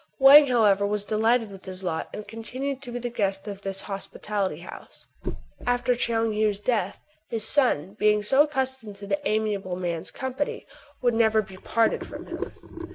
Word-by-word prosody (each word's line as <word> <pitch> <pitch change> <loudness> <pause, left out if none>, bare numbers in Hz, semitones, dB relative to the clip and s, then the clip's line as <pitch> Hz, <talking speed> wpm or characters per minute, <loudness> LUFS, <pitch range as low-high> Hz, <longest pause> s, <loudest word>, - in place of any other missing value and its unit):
Wang, 280 +2 +9
however, 210 -6 +4
was 205 0 -1
delighted 220 +1 +2
with 195 -1 -12
his 185 0 -7
lot, 160 -3 -2
and 210 - -7
continued 255 +5 -5
to 250 -3 -8
be 240 - -3
the 245 0 -4
guest 195 -3 -1
of 200 -1 -6
this 195 -1 -4
hospitable 195 -3 -3
house. - - -11 0.6
After 245 0 +2
Tchoung 230 -2 0
Heou's 210 -1 +1
death, 205 -3 -1 0.3
his 225 -2 0
son, 210 - +2
being 210 0 +3
so 265 +7 +4
accustomed 265 -7 -1
to 200 0 -10
the 195 0 -1
amiable 210 -4 -1
man's 175 -2 -3
company, 260 +2 -3 0.4
would 245 -1 +3
never 220 -1 +3
be 190 -1 -12
parted 225 +4 +1
from - - -8
him. - - -5
215 Hz, 170 wpm, -26 LUFS, 195-245 Hz, 0.6 s, Wang